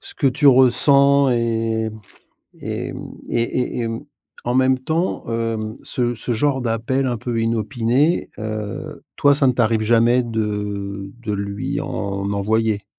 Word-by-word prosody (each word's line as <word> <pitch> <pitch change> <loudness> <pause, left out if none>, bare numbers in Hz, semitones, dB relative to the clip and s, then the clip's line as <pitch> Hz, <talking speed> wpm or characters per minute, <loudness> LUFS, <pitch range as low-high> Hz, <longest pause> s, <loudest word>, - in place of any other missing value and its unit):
ce - - -12
que 140 - 0
tu 140 +3 +2
ressens. 140 +1 +5
Et 115 -1 0
m 110 - -12 0.6
et - - -4
m, - - -7 0.3
et 115 - +1
et 125 +2 -1
et 115 - -1
mmh, 115 +6 -5 0.4
en 120 - -1
même 130 0 +3
temps, 160 +7 -2
hem, 115 -1 -2
ce 120 -1 -1
ce 120 +2 -3
genre 135 +3 +1
d'appel 120 +3 0
un 120 -2 -1
peu 115 0 -2
inopinés, 115 - +1
heu, 110 -1 -5
toi, 145 0 +4
ça 140 -2 +2
ne 125 - +3
t'arrive 115 -2 +2
jamais 120 +3 +4
de 105 -3 -3
de 105 -2 -2
lui 100 0 -3
en 100 0 -3
envoyer? 105 +1 0
115 Hz, 155 wpm, -21 LUFS, 110-130 Hz, 0.6 s, ressens